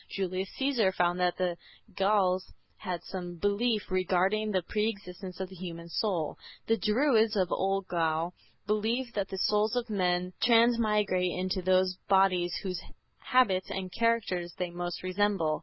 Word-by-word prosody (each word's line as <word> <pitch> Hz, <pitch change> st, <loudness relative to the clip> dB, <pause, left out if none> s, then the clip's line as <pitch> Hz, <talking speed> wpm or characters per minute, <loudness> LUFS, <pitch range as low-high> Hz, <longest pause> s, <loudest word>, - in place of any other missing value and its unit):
Julius 190 Hz, 0 st, -2 dB
Caesar 260 Hz, -8 st, +2 dB
found 175 Hz, -1 st, +1 dB
that 180 Hz, -1 st, +1 dB
the 180 Hz, -2 st, -1 dB, 0.4 s
Gauls 190 Hz, -2 st, +2 dB, 0.3 s
had 180 Hz, -2 st, -4 dB
some 180 Hz, -2 st, -6 dB
belief 205 Hz, +3 st, 0 dB
regarding 185 Hz, +3 st, +1 dB
the 190 Hz, -3 st, 0 dB
pre 210 Hz, +5 st, 0 dB
existence 190 Hz, -3 st, -8 dB
of 190 Hz, -1 st, -4 dB
the 190 Hz, -, -11 dB
human 170 Hz, -2 st, -7 dB
soul. 170 Hz, -5 st, -1 dB, 0.3 s
The 225 Hz, -, +3 dB
Druids 225 Hz, 0 st, +3 dB
of 185 Hz, -3 st, +1 dB
old 195 Hz, 0 st, 0 dB
Gaul 165 Hz, 0 st, 0 dB, 0.3 s
believed 225 Hz, +4 st, -1 dB
that 200 Hz, -2 st, -1 dB
the 190 Hz, -, -5 dB
souls 210 Hz, +4 st, +2 dB
of 240 Hz, -2 st, -2 dB
men 180 Hz, -2 st, 0 dB
transmigrate 215 Hz, -6 st, +3 dB
into 185 Hz, +1 st, -1 dB
those 185 Hz, 0 st, +2 dB
bodies 185 Hz, -3 st, +3 dB
whose 185 Hz, -2 st, -3 dB, 0.4 s
habits 200 Hz, -8 st, +2 dB
and 185 Hz, -1 st, -4 dB
characters 205 Hz, -7 st, 0 dB
they 180 Hz, -1 st, -3 dB
most 175 Hz, 0 st, -5 dB
resemble. 185 Hz, -4 st, +1 dB
190 Hz, 150 wpm, -29 LUFS, 180-210 Hz, 0.4 s, The